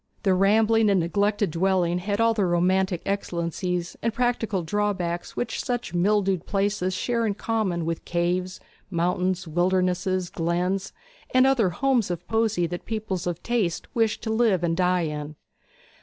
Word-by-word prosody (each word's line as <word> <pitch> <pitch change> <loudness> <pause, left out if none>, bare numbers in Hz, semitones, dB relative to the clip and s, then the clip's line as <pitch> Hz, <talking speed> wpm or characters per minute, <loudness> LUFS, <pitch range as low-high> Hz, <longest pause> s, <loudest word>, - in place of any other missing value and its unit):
The 195 -3 +3
rambling 215 +3 +4
and 195 -2 +3
neglected 200 +3 +1
dwelling 175 0 +1
had 200 +3 -2
all 230 0 +4
the 215 -3 0
romantic 180 +1 +1
excellencies 175 -2 -2
and 230 - 0
practical 225 -5 0
drawbacks 180 -2 -2
which 245 - -3
such 245 -7 -3
mildewed 190 0 +1
places 195 -2 0
share 235 +1 0
in 210 -3 0
common 200 -7 -1
with 165 0 -3
caves, 180 +2 -1 0.3
mountains, 180 +1 0
wildernesses, 180 +1 0
glens, 180 +4 -1 0.4
and 255 0 +6
other 255 -8 +3
homes 245 +3 +1
of 175 -1 -5
poesy 220 -5 +1
that 175 +1 -5
people 215 -4 -3
of 175 -1 -3
taste 215 -8 -1
wish 225 -3 +1
to 220 - -3
live 220 -6 +2
and 165 -1 +1
die 180 0 +2
in. 150 -1 -4
185 Hz, 150 wpm, -25 LUFS, 175-215 Hz, 0.4 s, and